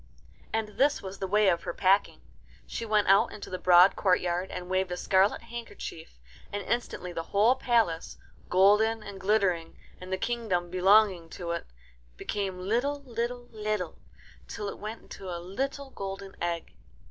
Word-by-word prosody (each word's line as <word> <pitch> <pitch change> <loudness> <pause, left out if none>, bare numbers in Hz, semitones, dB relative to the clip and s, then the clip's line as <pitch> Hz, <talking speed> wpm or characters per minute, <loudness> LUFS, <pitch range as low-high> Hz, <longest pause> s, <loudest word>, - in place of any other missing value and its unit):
And 220 -2 -3
this 285 -2 +3
was 195 0 -7
the 190 - -2
way 210 +2 +3
of 170 -2 +3
her - - -5
packing. 195 +1 +2 0.4
She 230 - -5
went 210 -1 +2
out 200 +4 +5
into 210 - -9
the 185 - -3
broad 180 +1 +7
courtyard 180 -1 +1
and 180 0 -6
waved 185 0 0
a 180 - -2
scarlet 190 +4 +2
handkerchief, 230 - -8 0.3
and 205 0 -3
instantly 180 -5 -3
the 165 - -2
whole 210 +5 +5
palace, 230 -10 0 0.3
golden 210 +4 +4
and 200 -1 -8
glittering, 190 -5 +1 0.2
and 185 +1 -9
the 190 - 0
kingdom 190 -6 -1
belonging 185 -2 +4
to 170 -1 -4
it, 170 - -4 0.5
became 195 -3 -3
little, 245 +10 -1
little, 240 0 -4
little, 215 -5 -3 0.5
till 205 - -5
it - - -8
went 215 +2 -6
into 190 - -9
a 175 - -3
little 270 +10 -4
golden 195 -2 -6
egg. 170 -1 -3
195 Hz, 160 wpm, -28 LUFS, 180-220 Hz, 0.5 s, broad